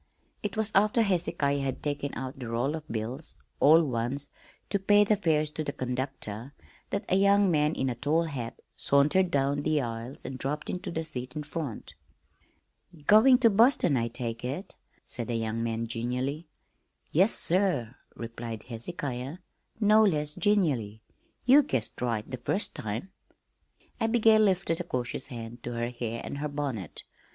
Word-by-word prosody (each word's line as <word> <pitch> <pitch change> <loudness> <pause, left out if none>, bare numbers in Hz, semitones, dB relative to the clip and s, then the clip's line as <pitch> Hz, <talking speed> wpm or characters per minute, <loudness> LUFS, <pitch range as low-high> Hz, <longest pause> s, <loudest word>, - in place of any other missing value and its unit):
It 205 0 -4
was 220 -1 +1
after 210 +4 +4
Hezekiah 165 -7 +1
had 135 -2 -3
taken 145 -1 -2
out 130 +2 -6
the 125 - -5
roll 120 +5 0
of 160 -1 -6
bills 120 +7 -3 0.2
all 160 +4 +7
ones 130 +1 -1 0.4
to 200 - +2
pay 205 +2 +5
the 210 +1 +3
fares 155 -6 +1
to 155 - -3
the 145 - -2
conductor 130 -2 -5 0.3
that 200 - -2
a - - +2
young 200 0 +4
man 150 0 +2
in 135 - -1
a 125 - 0
tall 145 +7 +1
hat 130 -8 -5 0.2
sauntered 150 +7 +3
down 140 -1 +1
the 155 0 +1
aisle 115 0 -4
and 130 -1 -6
dropped 150 +3 -2
into 180 - -4
the 160 -1 -2
seat 125 -5 -6
in 150 - -3
front. 145 -5 -5 1.1
"Going 235 - +7
to 235 -3 +5
Boston, 210 - +4
I 115 -2 +1
take 115 -1 -5
it," 140 +10 -4 0.3
said 120 -2 -5
the 120 - -2
young 115 0 -2
man 115 0 -1
genially. 125 +7 -3 0.6
"Yes, 190 +8 +4
sir," 170 - +1 0.2
replied 115 -1 -6
Hezehiah, 130 +3 -5 0.4
no 215 0 +6
less 150 -7 +1
genially. 140 - +1 0.4
"Ye 270 +4 +8
guessed 120 - -2
right 115 -3 -1
the 130 - -5
first 190 - -2
time." 110 - -5 0.9
Abigail 225 -1 +4
lifted 190 -5 +2
a - - -3
cautious 125 0 -3
hand 120 -2 -8
to 120 - -5
her 120 0 -2
hair 120 -1 -4
and 140 - -5
her 150 +1 -2
bonnet. 135 - -4
140 Hz, 160 wpm, -28 LUFS, 120-180 Hz, 1.1 s, Ye